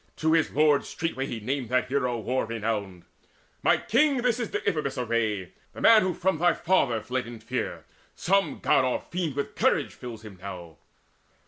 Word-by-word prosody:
To 160 0 +1
his 165 -2 +3
lord 150 -1 +3
Straightway 150 -5 -3
he 115 - -4
named 125 +2 -3
that 125 0 +1
hero 125 -3 0
war 120 +2 -1
renowned: 105 -5 -3 0.6
"My - - +4
king, 270 +1 +2
this 245 -1 +1
is 235 - -2
Deiphobus' 160 - -2
array 110 -6 -1 0.2
The - - -9
man 225 -1 +7
who 185 -2 -1
from 190 -3 0
thy 175 0 +3
father 120 - +1
fled 125 +1 -3
in 120 -1 -9
fear. 110 - -4 0.3
Some 195 +2 +1
God - - +4
or 130 -1 0
fiend 170 -6 -4
with 140 - -3
courage - - +1
fills 115 -3 -9
him 100 -4 -11
now." 90 -5 -8
130 Hz, 180 wpm, -27 LUFS, 115-170 Hz, 0.6 s, man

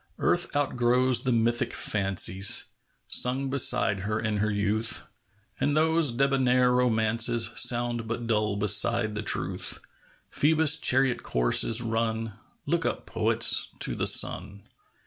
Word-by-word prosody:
ARTH - - -1
outgrows 125 -2 0
the 130 - 0
mythic 120 +1 -1
fancies 95 -1 +2 0.4
Sung 130 +2 0
beside 120 -6 +2
her 105 +3 -3
in 110 -2 -3
her 110 +1 -1
youth; 105 +2 -2 0.5
And 145 +1 -1
those 160 -2 +2
debonair 130 -1 +1
romances 115 -1 +1
Sound 120 -1 0
but 115 +1 -5
dull 105 -2 -1
beside 105 +2 +1
the 105 - -5
truth. 105 - -2 0.5
Phoebus' 160 +1 +2
chariot 130 -1 +1
course - - +1
is 115 +1 +2
run! 115 -1 -3 0.3
Look - - -1
up, - - -4
poets, - - +1
to - - +1
the - - -1
sun 100 0 0
115 Hz, 125 wpm, -26 LUFS, 110-125 Hz, 0.5 s, fancies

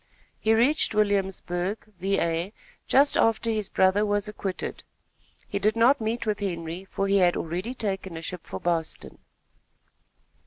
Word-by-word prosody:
He 220 +1 +3
reached 250 +1 +3
Williamsburg, 195 -2 0 0.2
Va., 175 -1 0 0.4
just 280 +2 +4
after 225 0 +2
his 215 -3 -1
brother 190 +2 +3
was 205 0 +1
acquitted. 200 -3 -5 0.6
He 200 - -2
did 215 +2 +2
not 240 +4 +4
meet 225 +2 -2
with 210 -2 -1
Henry, 175 -2 -4
for 195 0 -2
he 200 0 +3
had 180 -2 +4
already 180 +10 -3
taken 195 -6 -3
a - - -6
ship 180 0 -4
for - - -5
Boston. 170 -2 -3
200 Hz, 145 wpm, -26 LUFS, 180-220 Hz, 0.6 s, just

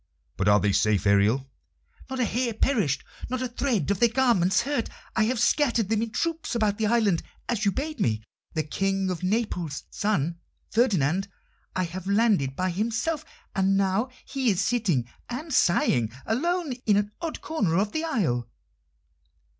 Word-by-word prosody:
"But 95 - 0
are 105 0 +6
they 100 +1 +2
safe, 105 0 +2
Ariel?" 105 +7 +3 0.6
"Not 265 0 -4
a 250 - +3
hair 235 0 -1
perished, 205 - +1 0.3
not 255 +1 -2
a - - 0
thread 235 - 0
of 200 - 0
their 235 - +5
garments 225 -7 +3
hurt. 275 -5 -1 0.3
I 220 - +3
have 240 +1 0
scattered 235 -8 +2
them 220 -1 +2
in 230 - -1
troops 325 +3 -2
about 215 -3 +1
the 220 - +2
island, 210 -6 +2 0.3
as 220 -3 -1
you 200 - +4
bade 300 - -4
me. 110 - 0 0.3
The 155 - +1
King 195 +4 -1
of 180 - -4
Naples' 185 -7 -1
son, 170 -5 0 0.3
Ferdinand, 195 - +2 0.5
I 185 - +1
have 180 +2 -6
landed 200 - +2
by 185 +3 0
himself, 240 - -1 0.3
and 195 0 +3
now 195 +5 +1 0.2
he 265 -2 0
is 190 -4 +1
sitting 190 - +1 0.2
and 290 +5 -5
sighing 120 - +3
alone 335 +5 0
in 205 -2 +5
an 205 0 0
odd 330 -2 -4
corner 205 - 0
of 205 +2 +1
the 315 - -2
isle." 140 - 0
205 Hz, 170 wpm, -26 LUFS, 170-245 Hz, 0.6 s, are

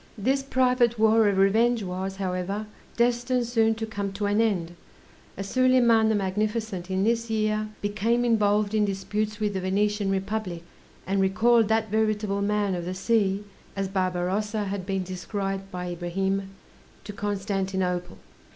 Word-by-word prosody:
This 265 +7 +1
private 250 -3 +2
war 220 0 +4
of 200 - 0
revenge 220 +4 +3
was, 190 +1 -4
however, 190 +2 -3 0.3
destined 240 +1 +1
soon 225 -1 +2
to 225 0 -3
come 200 -2 -4
to 205 +1 -3
an 205 +2 +2
end, 180 -7 0 0.6
as 195 +1 -4
Soliman 240 -2 +4
the 220 - +2
Magnificent 205 -1 -2
in 190 0 0
this 230 +1 +1
year 215 -1 0
became 220 +4 0
involved 210 -2 +2
in 215 -1 +3
disputes 210 +2 -2
with 210 -1 0
the 190 - -2
Venetian 205 +2 0
Republic, 195 -3 -2 0.4
and 195 +1 +1
recalled 220 +4 +3
"that 220 -1 0
veritable 210 -2 0
man 205 -1 +1
of 175 -1 -3
the 185 +1 -4
sea," 200 0 +1 0.3
as 195 -1 -1
Barbarossa 190 +3 -1
had 195 -2 -4
been 195 -1 -1
described 195 +2 -4
by 180 -1 -5
Ibrahim, 190 +3 -2 0.5
to 205 - -7
Constantinople. 190 -3 -2
205 Hz, 150 wpm, -26 LUFS, 190-220 Hz, 0.6 s, war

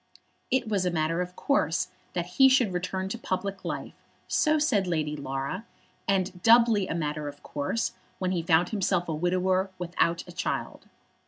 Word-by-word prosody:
It 260 -2 +1
was 205 -4 +1
a 180 - +1
matter 165 0 0
of 180 0 -5
course 180 - +1 0.2
that 175 -1 -1
he 265 +10 +5
should 250 -7 +3
return 185 +1 -2
to 235 - -4
public 195 -2 -3
life, - - -4 0.3
so 310 0 +3
said 230 -11 +2
Lady 155 -3 -1
Laura; 140 +7 -4 0.4
and 185 -2 0
doubly 230 -3 +5
a - - -2
matter 150 -2 -2
of 145 0 -9
course 145 +11 -2 0.2
when 185 -1 -1
he 175 -2 0
found 165 +1 +3
himself 185 -4 0
a 160 - -1
widower 185 +3 +1
without 170 -1 0
a - - -9
child. 180 +1 -3
180 Hz, 170 wpm, -27 LUFS, 165-200 Hz, 0.4 s, he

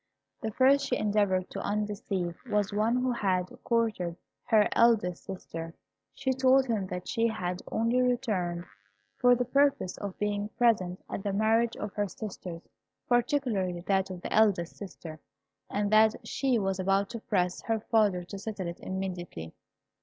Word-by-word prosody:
The 220 - -2
first 275 +4 +4
she 250 - +1
endeavoured 200 -3 +1
to - - -5
undeceive 200 -4 -2
was 205 -1 +1
one 215 +3 +2
who 250 0 +1
had 185 -6 0
courted 220 -8 0 0.3
her 215 -3 +4
eldest 220 -7 +3
sister. 165 -3 -7 0.4
She 265 -1 0
told 260 +1 +4
him 215 -6 -1
that 180 0 -5
she 230 -1 +1
had 180 -5 -3
only 230 +3 +2
returned 210 -9 0 0.5
for 245 0 +6
the 245 0 -1
purpose 275 -7 +2
of 200 -2 -5
being 205 0 -1
present 195 -7 +2
at - - -4
the 200 - -2
marriage 225 +3 +2
of 210 -1 -5
her 205 -1 -1
sisters, 180 -3 -7 0.4
particularly 240 - +1
that 190 +1 +1
of 180 -2 -7
her - - -3
eldest 200 -6 +3
sister, 170 -5 -9 0.5
and 205 0 -1
that 215 0 +6
she 265 -3 +1
was 195 -2 -1
about 195 +1 +1
to 230 - -5
press 185 -6 0
her 225 -1 -1
father 210 -5 +2
to 195 +3 -8
settle 200 -2 -5
it 170 - -6
immediately. 180 - -5
205 Hz, 160 wpm, -29 LUFS, 185-230 Hz, 0.5 s, for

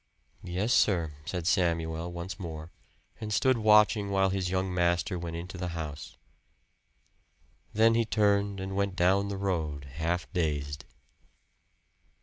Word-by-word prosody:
"Yes, 95 +7 -1
sir," 85 -7 +2
said 85 +1 -4
Samuel 85 -1 0
once 85 +3 -6
more, 80 -2 -7 0.5
and 105 -1 -5
stood 130 +3 +2
watching 105 -1 +4
while 95 -1 +2
his 95 -2 -1
young 95 0 -1
master 85 +1 +1
went 85 -1 -5
into 90 +2 -7
the 90 - -2
house. 75 -6 -6 1.5
Then 115 +2 +4
he 115 0 +3
turned 100 -2 +1
and 95 0 -4
went 100 -1 0
down 95 +2 +3
the 100 -1 -4
road, 80 -8 -2
half 80 +6 -2
dazed. 75 -4 -2
90 Hz, 135 wpm, -29 LUFS, 80-100 Hz, 1.5 s, watching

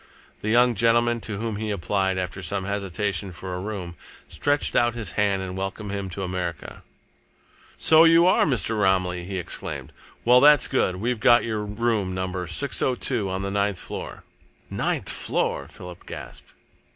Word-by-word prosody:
The 110 - -2
young 120 +2 +4
gentleman 115 +1 +2
to 105 -2 -5
whom 110 -1 -3
he 110 0 -3
applied, 95 -1 0
after 90 +1 -4
some 95 +1 -3
hesitation, 100 -1 -2
for 90 +1 -7
a 90 - -3
room, 95 -4 -5 0.3
stretched 145 0 -1
out 120 -1 +3
his 115 -3 -4
hand 100 -2 +1
and 95 -1 -6
welcomed 95 +2 -4
him 100 -1 -4
to 95 +2 -5
America. 90 -4 -5 1.0
"So 160 +1 +6
you 165 +1 +6
are 185 - +4
Mr. 115 -5 0
Romilly!" 90 -2 +1
he 95 +1 -4
exclaimed. 90 - -4 0.3
"Well, 125 +1 +6
that's 150 -1 +6
good. 110 -8 +1
We've 115 +5 -2
got 120 +2 +5
your 110 -2 -2
room 105 -3 -1
Number 95 -1 -3
602, 125 - 0
on 95 +1 -3
the 100 - -3
ninth 100 -1 0
floor." - - -7 0.5
"Ninth - - -1
floor!" 70 - -2
Philip 90 -1 -12
gasped. - - -9
100 Hz, 165 wpm, -24 LUFS, 95-115 Hz, 1.0 s, So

